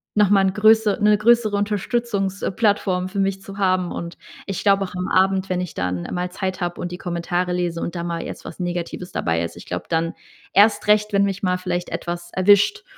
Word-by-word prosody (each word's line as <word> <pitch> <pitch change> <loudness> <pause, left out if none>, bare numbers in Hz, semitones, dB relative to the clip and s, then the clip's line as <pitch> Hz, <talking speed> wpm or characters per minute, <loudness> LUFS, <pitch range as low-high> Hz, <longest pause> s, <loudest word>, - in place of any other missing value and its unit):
nochmal 205 -2 +4
'n 190 - -1
größe 215 0 +4
'ne 210 0 +5
größere 220 -1 +3
Unterstützungs 205 -1 -1
äh, - - -1
Plattform 195 -3 +1
für 200 - -4
mich 195 0 0
zu 195 0 -10
haben. 185 -2 +1
Und 170 0 -6 0.3
ich 195 -3 -4
glaube 195 -1 +4
auch 185 - -10
am 180 0 -3
Abend, 190 0 +2
wenn 180 0 0
ich 180 - -6
dann 90 -1 -2
mal 180 0 -2
Zeit 185 0 -3
habe 175 0 -3
und 175 - -4
die 180 - -5
Kommentare 175 +1 -2
lese 175 -2 -1
und 170 - -4
da 170 - -3
mal 170 -1 -3
jetzt - - -8
was - - -10
Negatives 175 0 -4
dabei 80 0 0
ist. 85 - -5
Ich - - -11
glaube - - -4
dann 165 +1 0 0.4
erst 210 +1 +4
recht, 210 0 +3
wenn 200 0 +4
mich 200 0 -1
mal 180 -1 +1
vielleicht 180 -1 -3
etwas 175 0 -5
erwischt, 205 - +4
185 Hz, 215 wpm, -22 LUFS, 175-205 Hz, 0.4 s, ne